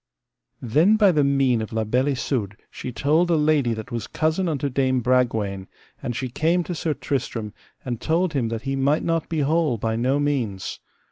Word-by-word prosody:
Then 155 Hz, -, +4 dB
by 205 Hz, -3 st, +5 dB
the 150 Hz, -4 st, +2 dB
mean 135 Hz, -4 st, +2 dB
of 110 Hz, -, -5 dB
La 110 Hz, 0 st, 0 dB
Beale 125 Hz, +5 st, +1 dB
Isoud 120 Hz, -7 st, -2 dB
she 125 Hz, -, -6 dB
told 150 Hz, +9 st, +2 dB
a 170 Hz, -, +4 dB
lady 150 Hz, -6 st, +2 dB
that 110 Hz, +3 st, -8 dB
was 115 Hz, -3 st, -4 dB
cousin 160 Hz, +3 st, 0 dB
unto 145 Hz, -2 st, -1 dB
Dame 130 Hz, -1 st, +1 dB
Bragwaine, 110 Hz, -6 st, 0 dB, 0.3 s
and 120 Hz, -, -3 dB
she 130 Hz, -, -2 dB
came 165 Hz, +8 st, +1 dB
to 175 Hz, -, -4 dB
Sir 160 Hz, -2 st, -2 dB
Tristram, 115 Hz, -6 st, -3 dB, 0.3 s
and 120 Hz, -3 st, -4 dB
told 165 Hz, +1 st, +1 dB
him 130 Hz, -5 st, 0 dB
that 115 Hz, 0 st, -4 dB
he 135 Hz, 0 st, -2 dB
might 140 Hz, +3 st, +1 dB
not 165 Hz, -1 st, -1 dB
be 160 Hz, -2 st, 0 dB
whole 150 Hz, -3 st, +1 dB
by 110 Hz, +1 st, -1 dB
no 130 Hz, +5 st, +1 dB
means. 125 Hz, -10 st, -2 dB
135 Hz, 195 wpm, -23 LUFS, 115-155 Hz, 0.3 s, by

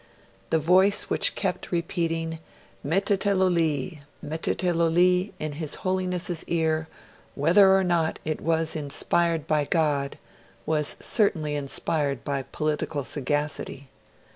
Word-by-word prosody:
The 160 Hz, -, +3 dB
voice 185 Hz, +6 st, +3 dB
which -, -, +2 dB
kept -, -, -3 dB
repeating 165 Hz, -2 st, -2 dB, 0.4 s
'Mettetelo 195 Hz, +4 st, +2 dB
li, 160 Hz, -1 st, 0 dB, 0.3 s
mettetelo 165 Hz, +2 st, 0 dB
li' 180 Hz, +3 st, +3 dB
in 155 Hz, -3 st, -4 dB
his 150 Hz, 0 st, -4 dB
Holiness's 180 Hz, -2 st, -1 dB
ear, 160 Hz, -1 st, 0 dB, 0.5 s
whether 180 Hz, +7 st, +5 dB
or 195 Hz, -, +3 dB
not 170 Hz, -3 st, +1 dB
it 155 Hz, 0 st, -2 dB
was 160 Hz, 0 st, 0 dB
inspired 160 Hz, +2 st, 0 dB
by 155 Hz, -2 st, +1 dB
God, 145 Hz, -4 st, 0 dB, 0.5 s
was 150 Hz, -1 st, 0 dB
certainly 160 Hz, -9 st, +1 dB
inspired 145 Hz, 0 st, -1 dB
by 140 Hz, -2 st, -1 dB
political 150 Hz, +1 st, -2 dB
sagacity. 145 Hz, 0 st, -3 dB
160 Hz, 115 wpm, -26 LUFS, 150-180 Hz, 0.5 s, whether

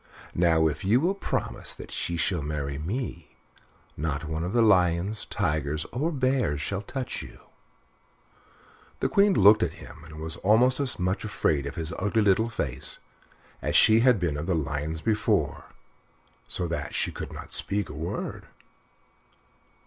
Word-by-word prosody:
Now, 80 Hz, -2 st, +3 dB
if 75 Hz, -, -3 dB
you 105 Hz, +6 st, +4 dB
will 175 Hz, +7 st, +1 dB
promise 200 Hz, -, -3 dB
that -, -, -10 dB
she 85 Hz, -, -2 dB
shall 85 Hz, 0 st, 0 dB
marry 70 Hz, -1 st, -3 dB
me, 90 Hz, -, -5 dB, 0.6 s
not 75 Hz, -1 st, -3 dB
one 80 Hz, +1 st, -3 dB
of 90 Hz, -, -3 dB
the 120 Hz, +1 st, +3 dB
lions, 95 Hz, 0 st, +2 dB
tigers, 75 Hz, -5 st, -1 dB
or 150 Hz, +8 st, -1 dB
bears 130 Hz, -, 0 dB
shall 100 Hz, +7 st, -3 dB
touch 130 Hz, +5 st, -4 dB
you." -, -, -11 dB, 1.6 s
The -, -, 0 dB
Queen 200 Hz, -1 st, +4 dB
looked 105 Hz, +3 st, +7 dB
at -, -, 0 dB
him 80 Hz, -, -13 dB
and 80 Hz, -1 st, -12 dB
was 80 Hz, +2 st, +4 dB
almost 115 Hz, +8 st, +3 dB
as 135 Hz, -6 st, -1 dB
much 90 Hz, 0 st, -1 dB
afraid 75 Hz, -9 st, 0 dB
of -, -, -6 dB
his 80 Hz, -1 st, -3 dB
ugly 105 Hz, +3 st, +1 dB
little 105 Hz, +3 st, +3 dB
face 65 Hz, -, -1 dB, 0.6 s
as -, -, -2 dB
she 110 Hz, +1 st, +7 dB
had 125 Hz, -3 st, +4 dB
been 85 Hz, -5 st, -1 dB
of 75 Hz, +4 st, -4 dB
the 95 Hz, -, +1 dB
lions 75 Hz, +1 st, -3 dB
before, 110 Hz, +1 st, 0 dB, 0.8 s
so 90 Hz, -, -2 dB
that 80 Hz, -3 st, -4 dB
she -, -, +1 dB
could -, -, -7 dB
not -, -, -8 dB
speak 100 Hz, +1 st, +2 dB
a -, -, -9 dB
word. -, -, -5 dB
90 Hz, 160 wpm, -26 LUFS, 80-110 Hz, 1.6 s, looked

